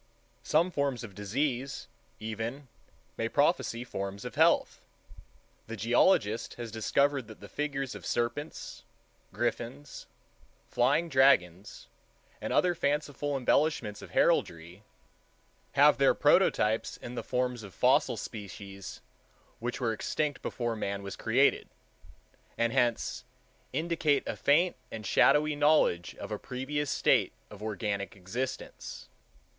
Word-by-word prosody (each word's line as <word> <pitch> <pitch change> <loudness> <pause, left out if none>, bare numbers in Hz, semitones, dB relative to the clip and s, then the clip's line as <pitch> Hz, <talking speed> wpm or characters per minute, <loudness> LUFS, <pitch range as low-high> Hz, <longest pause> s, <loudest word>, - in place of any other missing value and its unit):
Some 170 +4 +2
forms 140 -6 -1
of 105 -4 -9
disease, 130 +6 -2 0.3
even, 115 +5 -5 0.5
may - - -1
prophesy 115 +1 +1
forms 100 -4 -5
of - - -5
health. - - +3 0.9
The 115 0 -6
geologist 115 - +2
has 120 -2 -6
discovered 135 +4 +1
that 110 - -12
the - - -10
figures 135 -3 -3
of - - -9
serpents, 120 +6 -3 0.5
griffins, 70 +1 -4 0.6
flying 140 +8 +2
dragons, 105 - +2 0.6
and - - -3
other 180 -1 +3
fanciful 145 -2 -1
embellishments 125 -5 +1
of - - -10
heraldry, 85 +3 +1 0.9
have - - +5
their - - +5
prototypes 110 +1 +3
in 120 - -8
the 120 - -4
forms 125 -1 -1
of 100 -2 -10
fossil - - +2
species 100 -2 -8 0.6
which 120 +2 -3
were 115 -3 0
extinct 145 +6 -2
before 120 -2 -2
man 100 -2 -3
was 100 - -6
created, - - +2 0.9
and 115 0 +1
hence 120 -3 0 0.5
"indicate 155 -1 +1
a - - -2
faint 170 +6 +3
and 110 -1 -7
shadowy 150 +9 +4
knowledge 145 - +2
of - - -8
a 105 - -3
previous 135 +3 -3
state - - +2 0.2
of 105 -1 -11
organic 105 -2 -3
existence." 120 +8 -6
120 Hz, 120 wpm, -30 LUFS, 105-145 Hz, 0.9 s, have